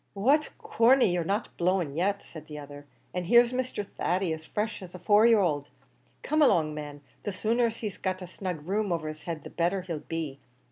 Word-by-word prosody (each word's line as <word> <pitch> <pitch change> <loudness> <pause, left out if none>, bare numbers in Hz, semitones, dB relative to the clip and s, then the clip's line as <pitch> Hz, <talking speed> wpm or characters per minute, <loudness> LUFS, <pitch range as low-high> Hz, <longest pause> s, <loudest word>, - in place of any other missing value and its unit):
"What, 275 +10 +3
Corney, 260 - +4
you're 175 -1 0
not 200 +7 -2
blown 175 -4 +1
yet!" 200 +4 0
said 155 -2 -11
the 150 - -8
other, 145 0 -10 0.3
"an' 180 -1 -2
here's 240 +5 +5
Mr. 250 -5 -2
Thady 180 -2 -1
as 160 0 -7
fresh 210 +6 -3
as 185 -1 -10
a - - -5
four 205 +5 +5
year 225 -3 +5
old. 145 -5 0 0.5
Come 310 +1 +1
along, 160 - +4
man; 145 -1 -7 0.2
the 205 - -3
sooner 230 +5 +1
he's 220 -3 -6
got 185 -1 -2
a - - -5
snug 175 -3 -6
room 205 0 0
over 165 -2 -1
his 155 0 -8
head 160 -3 -4
the - - -9
better 175 +3 0
he'll 170 -4 -4
be. 155 -4 -5
185 Hz, 205 wpm, -28 LUFS, 160-215 Hz, 0.5 s, here's